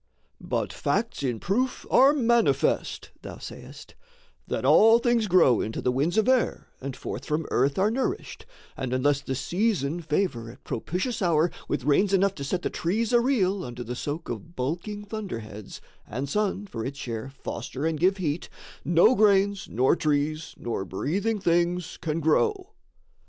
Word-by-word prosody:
"But - - -2
facts 230 - -1
in 125 -5 -1
proof 245 +7 -1
are 270 +2 +7
manifest," 235 -4 +1
thou - - -8
sayest, - - -10 0.5
"That - - -2
all 225 +2 +7
things 235 -2 +1
grow 170 - +5
into 110 - -3
the 125 - +1
winds 145 - 0
of 220 - +3
air 255 -2 +1
And 135 0 -5
forth - - -6
from 150 +1 -1
earth 140 +1 +2
are 200 +3 +3
nourished, 270 - -3 0.3
and 130 -3 -3
unless 140 +2 +2
The 135 - -3
season 175 - 0
favour 150 -8 -1
at 115 - -14
propitious 185 - -3
hour 170 -2 +3 0.2
With 125 - -2
rains 190 +8 +3
enough 195 0 +2
to 140 - -5
set 175 +6 -2
the - - -1
trees 215 +7 -1
a 240 - +6
reel 200 -7 +1
Under 120 -2 -6
the 120 +1 -5
soak 145 +6 -4
of 170 0 -7
bulking 175 +11 -3
thunderheads, 115 - -7 0.3
And 130 +5 -4
sun, 205 +4 -1
for 115 - -6
its 135 +3 -5
share, 120 -1 -5
foster 135 +1 -5
and 160 -2 -1
give 190 +3 +3
heat, 165 -3 -2 0.3
No 175 +8 +5
grains, 200 -3 +3
nor 130 +7 +3
trees, 155 0 -1
nor 115 -5 -3
breathing 190 - -1
things 175 -1 0
can 160 -1 -2
grow." 375 - +1
170 Hz, 165 wpm, -26 LUFS, 140-210 Hz, 0.5 s, are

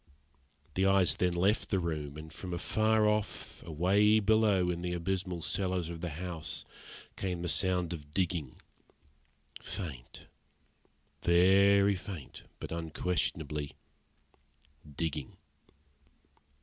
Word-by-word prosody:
The 95 +1 +2
eyes 95 -2 +4
then 90 -1 +1
left 100 +6 +2
the 100 - +2
room; 75 -5 -3
and 80 0 -9
from 90 +3 -5
afar 110 +4 +2
off, 105 -1 -2
away 95 +7 +3
below, 105 -4 +3
in 85 0 -4
the 90 0 -2
abysmal 90 0 -2
cellars 90 -2 0
of 85 -1 -7
the 90 - -2
house, 85 0 -4 0.5
came 90 -3 -3
the - - -1
sound 90 -2 +1
of 75 -3 -8
digging 85 -5 -2 1.0
faint, 75 -11 -7 1.0
very 100 +3 +5
faint, 95 -6 -8
but - - -7
unquestionably 80 -3 -2 1.2
digging. 75 -5 -3
90 Hz, 110 wpm, -31 LUFS, 80-95 Hz, 1.2 s, very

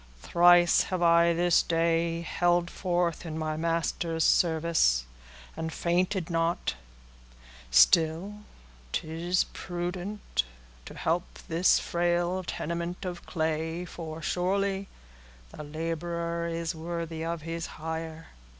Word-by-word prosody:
"Thrice 175 - +5
have 185 -2 -2
I 170 0 +5
this 175 0 +3
day 165 0 +1
held 175 +1 +1
forth 175 -3 -1
in 160 -2 -5
my 155 -1 -2
Master's 165 0 -1
service, 160 - +3 0.5
and 160 0 -4
fainted 180 +2 0
not; 165 - 0 1.0
still 160 - +4 0.5
it - - -1
is 170 +3 0
prudent 180 - -3 0.4
to - - -10
help 170 +2 0 0.2
this 170 +3 +4
frail 175 +1 0
tenement 170 +2 -4
of 175 -1 -6
clay, 160 +1 -2
for, 165 -2 -7
surely, 195 +3 0 0.6
'the - - -8
laborer 170 +2 -3
is 165 0 -2
worthy 165 0 -4
of 165 -1 -3
his 165 0 -4
hire. 160 0 -5
170 Hz, 110 wpm, -28 LUFS, 160-175 Hz, 1.0 s, Thrice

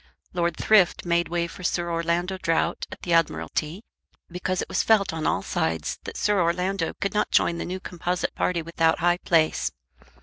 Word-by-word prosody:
Lord 170 -2 0
Thrift 200 -6 +3
made 170 0 +1
way 170 0 0
for 170 +2 -10
Sir 175 -1 -1
Orlando 170 +3 -1
Drought 165 0 0
at - - -10
the 175 - 0
Admiralty, 165 +2 0 0.5
because 180 +1 -2
it - - -2
was - - 0
felt 205 -5 +3
on 160 -1 -2
all - - 0
sides 80 0 -2
that - - -6
Sir 205 -2 +2
Orlando 180 +1 0
could 195 - -1
not 210 - +1
join 170 0 +2
the - - -3
new 185 +1 -4
composite 180 -1 -3
party 170 -2 -1
without 165 0 +1
high 175 +1 +2
place. 160 -3 +2
175 Hz, 180 wpm, -25 LUFS, 165-180 Hz, 0.5 s, Thrift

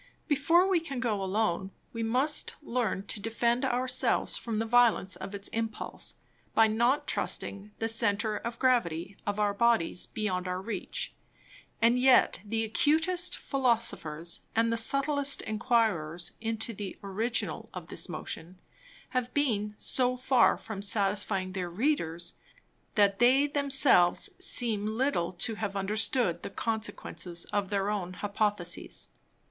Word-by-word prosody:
Before 330 +5 +4
we 375 -3 +3
can 280 -6 -5
go 220 -5 -1
alone, 190 -1 0 0.2
we 230 - -4
must 255 +7 +1
learn 230 -7 -1
to 210 - -5
defend 235 +3 0
our 255 -1 0
selves - - +1
from 230 -2 -4
the 225 - 0
Violence 225 -5 +3
of 190 +3 -7
its 200 0 -2
Impulse, 225 -1 -2 0.4
by 225 - +7
not 235 +6 +2
trusting 200 +1 -2
the 225 - -1
Center 220 -1 +1
of 230 +2 -5
Gravity 195 -9 +1
of 205 0 -1
our 205 -1 +2
Bodies 225 -6 +3
beyond 185 -4 -2
our 180 0 -2
reach; 200 0 -4 0.7
and 235 +2 +5
yet 260 0 +5
the 225 +1 -1
acutest 320 +10 +2
Philosophers, 220 - -1 0.2
and 230 0 +2
the - - +1
subtilest 275 +4 0
Enquirers 210 -8 0
into 225 +1 -2
the 200 -2 -6
Original 220 +5 -2
of - - -8
this - - -4
Motion, 175 +3 -6 0.5
have 250 -1 -2
been 210 -7 0
so 255 -1 +2
far 255 -1 +4
from 220 -3 -7
satisfying 200 -1 0
their 180 -2 -3
Readers, 175 - -1 0.6
that 200 -3 +3
they 260 +4 +5
themselves 280 - +4
seem 220 - +1
little 255 -10 0
to 205 +6 +1
have 200 -2 -2
understood 205 - 0
the - - -5
Consequences 205 -5 -4
of 200 -2 0
their 200 0 0
own 185 -4 -3
Hypotheses. 200 - -2
220 Hz, 140 wpm, -29 LUFS, 195-250 Hz, 0.7 s, by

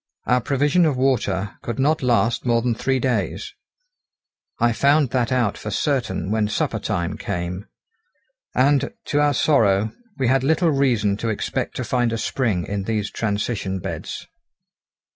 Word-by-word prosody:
Our 125 0 +2
provision 145 +7 +2
of 140 -4 0
water 105 -7 0
could 120 - -4
not 150 +4 +2
last 120 -2 +2
more 115 -2 +2
than 125 -1 +1
three 130 +3 0
days. 130 -1 -2 1.0
I 120 0 +2
found 140 +1 +3
that 125 -1 0
out 120 -5 +1
for 105 - -5
certain 105 - -1
when 110 -1 +1
supper 105 - -1
time 85 0 -2
came. 90 +4 -4 0.9
And, 140 - +2
to 145 - 0
our 145 -1 +3
sorrow, 110 -8 +3 0.3
we 135 - 0
had 130 +1 +3
little 160 +3 +2
reason 120 -8 +2
to 115 - -2
expect 105 - -2
to - - -2
find 120 -2 0
a 115 - -1
spring 110 -7 -1
in 100 -1 -3
these 105 -2 -2
transition 100 -2 -2
beds. - - -6
120 Hz, 155 wpm, -22 LUFS, 105-135 Hz, 1.0 s, found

